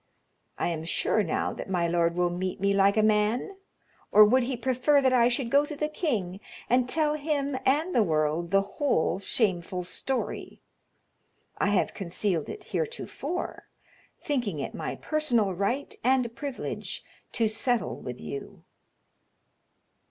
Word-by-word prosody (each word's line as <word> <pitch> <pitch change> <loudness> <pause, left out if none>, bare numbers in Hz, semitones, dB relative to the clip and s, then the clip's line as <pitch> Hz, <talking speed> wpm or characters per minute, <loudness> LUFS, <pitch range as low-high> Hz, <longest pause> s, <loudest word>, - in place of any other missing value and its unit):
I - - 0
am 160 -2 -3
sure 170 +5 +1
now 170 -6 -1
that - - -7
my 175 -2 +1
lord 170 0 +1
will 175 0 +1
meet 185 +1 -3
me 200 +1 +2
like 200 +1 +4
a 215 - +4
man; 215 - +1 0.5
or 210 0 +9
would 255 +5 +4
he 250 +1 -2
prefer 260 +4 +3
that 260 -2 +3
I 240 -2 +5
should 240 -1 -1
go 285 +1 +5
to 295 0 -6
the 300 +1 -1
king 220 - -2 0.3
and 250 0 +2
tell 305 0 +2
him 285 -2 -1
and 310 +7 +2
the 235 - +4
world 160 -2 +1
the 195 +1 +3
whole 200 - 0
shameful 185 -4 0
story? 255 +8 -3 1.0
I - - +2
have 205 -2 +1
concealed 180 -3 -2
it - - -7
heretofore, 455 -6 -4 0.5
thinking 240 - -2
it 135 - -4
my - - -4
personal 245 -11 +1
right 220 +10 -2
and 250 -2 +2
privilege 280 -3 -5 0.3
to 230 -2 +2
settle 225 +2 0
with - - -6
you." 415 - -7
225 Hz, 150 wpm, -27 LUFS, 185-275 Hz, 1.0 s, or